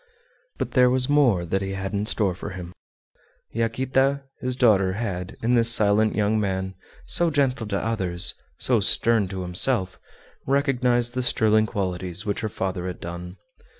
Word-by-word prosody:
But -, -, -4 dB
there 125 Hz, -2 st, +4 dB
was 130 Hz, 0 st, +1 dB
more 125 Hz, -12 st, +2 dB
that 95 Hz, +3 st, -2 dB
he 95 Hz, 0 st, -4 dB
had 95 Hz, +1 st, -5 dB
in 105 Hz, +1 st, -2 dB
store 100 Hz, -5 st, 0 dB
for 95 Hz, -, -8 dB
him. 90 Hz, -2 st, -9 dB, 0.8 s
Yaquita, 130 Hz, +4 st, 0 dB, 0.2 s
his 125 Hz, 0 st, -3 dB
daughter, 100 Hz, -7 st, +3 dB
had, 95 Hz, -4 st, -5 dB
in 120 Hz, +2 st, +1 dB
this 115 Hz, -1 st, +6 dB
silent 110 Hz, -1 st, +3 dB
young 110 Hz, +1 st, +1 dB
man, 95 Hz, -2 st, -3 dB, 0.3 s
so 175 Hz, -1 st, +3 dB
gentle 135 Hz, -6 st, -1 dB
to 100 Hz, -1 st, -2 dB
others, 95 Hz, -5 st, +1 dB, 0.2 s
so -, -, +2 dB
stern 115 Hz, -4 st, +2 dB
to 95 Hz, 0 st, -6 dB
himself, 95 Hz, +2 st, +1 dB, 0.5 s
recognized 125 Hz, -3 st, 0 dB
the 130 Hz, -, -2 dB
sterling 110 Hz, -3 st, +3 dB
qualities 95 Hz, -1 st, -4 dB
which 100 Hz, -1 st, -2 dB
her 110 Hz, -, -3 dB
father 95 Hz, -2 st, -4 dB
had 90 Hz, -, -6 dB
done. 90 Hz, +2 st, -8 dB
105 Hz, 160 wpm, -23 LUFS, 95-125 Hz, 0.8 s, this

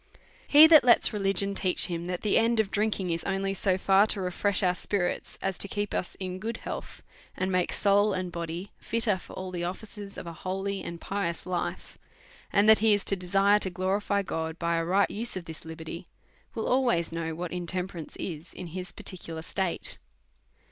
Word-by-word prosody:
He 295 Hz, +2 st, +9 dB
that 320 Hz, -1 st, +8 dB
lets 240 Hz, -1 st, +5 dB
religion 195 Hz, -1 st, +2 dB
teach 185 Hz, -2 st, +2 dB
him 170 Hz, -1 st, -4 dB
that 180 Hz, -1 st, -3 dB
the 210 Hz, -, +2 dB
end 230 Hz, 0 st, +3 dB
of 215 Hz, -3 st, +1 dB
drink 215 Hz, 0 st, +1 dB
ing 180 Hz, -2 st, -2 dB
is 165 Hz, 0 st, -1 dB
only 195 Hz, 0 st, -1 dB
so 190 Hz, -1 st, +2 dB
far 195 Hz, +2 st, +4 dB
to 210 Hz, -, +1 dB
refresh 190 Hz, +2 st, 0 dB
our 180 Hz, -1 st, +3 dB
spirits 180 Hz, 0 st, -2 dB
as 195 Hz, -1 st, -2 dB
to -, -, -1 dB
keep 205 Hz, +1 st, -3 dB
us 180 Hz, -, -3 dB
in 185 Hz, -1 st, -4 dB
good 225 Hz, +3 st, -4 dB
health, -, -, -7 dB, 0.3 s
and 190 Hz, +1 st, -1 dB
make 180 Hz, -1 st, +1 dB
soul 205 Hz, +1 st, +3 dB
and 185 Hz, -2 st, -3 dB
body 170 Hz, +3 st, -5 dB
fitter 225 Hz, -4 st, +1 dB
fqr -, -, -12 dB
all 185 Hz, 0 st, -5 dB
the 175 Hz, -1 st, -3 dB
offices 200 Hz, +2 st, -6 dB
of -, -, -6 dB
a 170 Hz, -, -6 dB
holy 195 Hz, +4 st, -3 dB
and 170 Hz, -1 st, -7 dB
pious 180 Hz, -4 st, -3 dB
life, 180 Hz, -1 st, -4 dB, 0.5 s
and 200 Hz, +1 st, +4 dB
that 220 Hz, 0 st, +8 dB
he 220 Hz, -1 st, +5 dB
is 205 Hz, -, -2 dB
to 195 Hz, -, 0 dB
desire 195 Hz, +3 st, +3 dB
to 190 Hz, -, 0 dB
glorify 195 Hz, +2 st, 0 dB
God 160 Hz, -3 st, -3 dB
by 170 Hz, -1 st, 0 dB
a 165 Hz, -, 0 dB
right 190 Hz, +4 st, +2 dB
use 225 Hz, -1 st, -3 dB
of 180 Hz, -, -7 dB
this 160 Hz, 0 st, -8 dB
liberty, 160 Hz, +2 st, -8 dB, 0.5 s
will 225 Hz, -, -2 dB
always 240 Hz, -11 st, +2 dB
know 165 Hz, -1 st, -3 dB
what 175 Hz, +1 st, -5 dB
intemperance 180 Hz, -2 st, -4 dB
is 165 Hz, -2 st, -6 dB
in 180 Hz, -, -6 dB
his 185 Hz, 0 st, -5 dB
particu 175 Hz, -3 st, -7 dB
lar 160 Hz, -, -6 dB
state. 190 Hz, 0 st, -2 dB
190 Hz, 205 wpm, -28 LUFS, 175-205 Hz, 0.5 s, He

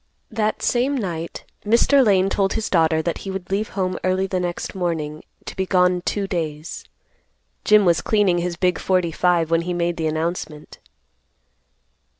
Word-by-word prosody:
That 215 Hz, -1 st, -1 dB
same 260 Hz, +3 st, +1 dB
night, 170 Hz, -7 st, -4 dB, 0.2 s
Mr. 235 Hz, +6 st, +4 dB
Lane 195 Hz, -4 st, +3 dB
told 195 Hz, 0 st, 0 dB
his 220 Hz, -1 st, -3 dB
daughter 160 Hz, -2 st, +3 dB
that 170 Hz, -1 st, -2 dB
he 195 Hz, -, -7 dB
would 190 Hz, -1 st, -6 dB
leave 205 Hz, +2 st, -1 dB
home 185 Hz, -1 st, -1 dB
early 185 Hz, +1 st, +1 dB
the 185 Hz, -1 st, -2 dB
next 175 Hz, -1 st, -4 dB
morning 160 Hz, -5 st, -3 dB, 0.2 s
to -, -, -7 dB
be 190 Hz, 0 st, -2 dB
gone 180 Hz, -1 st, +3 dB
two 200 Hz, +2 st, -2 dB
days. 160 Hz, -4 st, -4 dB, 0.8 s
Jim 210 Hz, -1 st, +5 dB
was 170 Hz, -2 st, +3 dB
cleaning 200 Hz, -5 st, +2 dB
his 175 Hz, 0 st, -2 dB
big 180 Hz, -1 st, +1 dB
forty 180 Hz, -3 st, +1 dB
five 170 Hz, -1 st, +1 dB
when 165 Hz, 0 st, +3 dB
he 175 Hz, +1 st, -3 dB
made 175 Hz, 0 st, -1 dB
the 160 Hz, -1 st, -1 dB
announcement. 155 Hz, -1 st, -4 dB
180 Hz, 165 wpm, -22 LUFS, 170-195 Hz, 0.8 s, Jim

